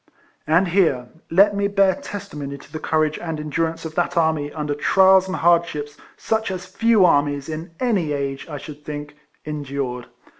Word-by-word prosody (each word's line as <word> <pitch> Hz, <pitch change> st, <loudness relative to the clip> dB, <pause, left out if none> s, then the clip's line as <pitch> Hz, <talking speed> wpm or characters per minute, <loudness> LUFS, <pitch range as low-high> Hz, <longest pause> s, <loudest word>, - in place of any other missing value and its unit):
And 170 Hz, +4 st, +3 dB
here 160 Hz, -10 st, +2 dB, 0.2 s
let 200 Hz, +4 st, +5 dB
me 200 Hz, 0 st, +1 dB
bear 195 Hz, -1 st, +3 dB
testimony 170 Hz, -, -7 dB
to 140 Hz, +1 st, -17 dB
the 155 Hz, -, -5 dB
courage 155 Hz, -1 st, 0 dB
and 165 Hz, -3 st, -4 dB
endurance 165 Hz, +2 st, -2 dB
of 160 Hz, -, -5 dB
that 175 Hz, +1 st, -1 dB
army 160 Hz, -3 st, +1 dB
under 150 Hz, -1 st, -3 dB
trials 190 Hz, +5 st, +4 dB
and 190 Hz, -, -3 dB
hardships 165 Hz, -4 st, +1 dB, 0.2 s
such 220 Hz, -1 st, -1 dB
as 185 Hz, -1 st, -5 dB
few 210 Hz, +1 st, +3 dB
armies, 145 Hz, -3 st, +2 dB
in 160 Hz, +1 st, -6 dB
any 200 Hz, -11 st, +1 dB
age, 140 Hz, 0 st, -3 dB
I 150 Hz, -, -5 dB
should 150 Hz, +1 st, -10 dB
think, 145 Hz, -1 st, -6 dB, 0.3 s
endured. 140 Hz, -4 st, -4 dB
160 Hz, 165 wpm, -22 LUFS, 145-190 Hz, 0.3 s, let